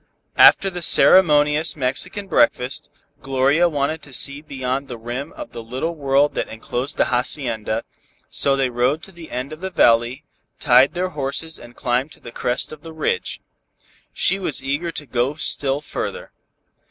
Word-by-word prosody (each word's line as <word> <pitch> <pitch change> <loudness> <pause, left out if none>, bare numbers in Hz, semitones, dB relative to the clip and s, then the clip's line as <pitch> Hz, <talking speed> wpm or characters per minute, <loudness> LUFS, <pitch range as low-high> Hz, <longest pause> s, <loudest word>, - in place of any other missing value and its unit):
After 195 - +7
the 175 -1 -6
ceremonious 150 -2 +5
Mexican 155 +9 -3
breakfast, 130 -6 +1 0.3
Gloria 140 +6 +2
wanted 150 +1 -2
to 140 - -13
see 140 +2 -1
beyond 135 -2 -4
the 120 - -7
rim 120 +5 -6
of - - -9
the 115 - -7
little 130 +9 -4
world 140 -1 +2
that - - -2
enclosed 120 +5 -4
the - - +3
hacienda, 120 -3 -1 0.4
so 140 -1 +1
they 135 -2 0
rode 125 +6 0
to 195 - -10
the 170 -3 -12
end 130 +4 -5
of 155 - -10
the 190 - -3
valley, 120 -2 +2 0.4
tied 130 +3 +4
their 185 +1 -1
horses 150 +1 -4
and 120 0 -14
climbed 130 +2 -1
to - - -13
the 120 - -11
crest 125 +2 -1
of 155 -1 -10
the 165 0 -10
ridge. 455 - -2 0.7
She 195 - +1
was 155 -8 -2
eager 145 +6 -2
to 150 - -5
go 130 +2 -1
still 145 -2 +1
further. - - -6
140 Hz, 165 wpm, -21 LUFS, 125-155 Hz, 0.7 s, After